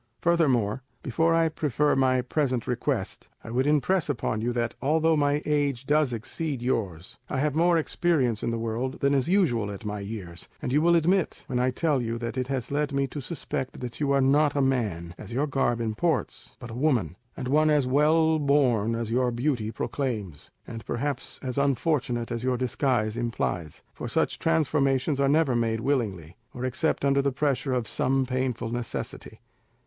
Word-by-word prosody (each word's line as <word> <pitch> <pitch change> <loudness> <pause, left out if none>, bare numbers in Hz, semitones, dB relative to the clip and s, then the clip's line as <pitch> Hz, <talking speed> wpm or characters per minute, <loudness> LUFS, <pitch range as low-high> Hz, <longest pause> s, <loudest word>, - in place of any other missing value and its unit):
Furthermore, 135 -10 +2 0.2
before 165 +5 +2
I 165 0 +4
prefer 150 -2 +1
my 130 -1 +2
present 130 -3 -1
request, 125 - -2
I 115 - -8
would 130 +4 +1
impress 150 +4 +2
upon 115 -5 -1
you 120 +2 0
that 120 -1 -1
although 160 +3 +3
my 145 0 +1
age 145 -4 0
does 150 -2 +2
exceed 135 +5 -3
yours, 100 -9 -3
I 140 - -2
have 150 +1 +1
more 170 +2 +3
experience 150 - +1
of - - -1
the 115 - -1
world 115 +3 -3
than 140 0 +3
is 140 +3 +1
usual 130 - +2
at 100 +2 -8
my 105 0 -3
years, 100 -4 -7
as - - -3
you 145 +3 +3
will 170 +1 +4
admit 175 +3 +1
when 125 - -2
I 125 +1 +2
tell 145 +1 +1
you 115 0 -2
that 115 +1 -4
it 130 -1 -2
has 130 -2 -3
led 145 +1 0
me 140 0 +1
to 145 - -6
suspect 135 -2 -5
that 125 -2 -6
you 145 -2 +1
are 140 0 +3
not 145 +2 +3
a - - +1
man, 105 -11 -1
as - - -9
your 135 +5 +1
garb 135 -5 0
imports, 115 +9 -2
but 120 -2 -9
a - - -7
woman, 120 - +1 0.2
and 130 - -4
one 155 +3 +3
as 150 -3 +3
well 155 +4 +3
born 125 -7 +2
as 115 -1 -3
your 125 +1 +2
beauty 120 -2 -1
proclaims, 110 - -4 0.2
and 115 -1 -8
perhaps 135 +4 -3
as 130 +1 -2
unfortunate 135 -4 0
as 115 0 -3
your 130 -1 +1
disguise 120 -3 0
implies, 115 -9 -3
for - - -6
such - - 0
transformations 145 -3 +1
are 140 0 +3
never 150 -3 +3
made 115 -1 0
willingly, 105 - -2 0.2
or 125 +1 -3
except 130 +3 0
under 140 0 +3
the 140 0 +1
pressure 135 -1 0
of 120 -3 -1
some 135 +4 +1
painful 125 -3 -2
necessity. 120 -1 -5
130 Hz, 185 wpm, -26 LUFS, 115-150 Hz, 0.2 s, I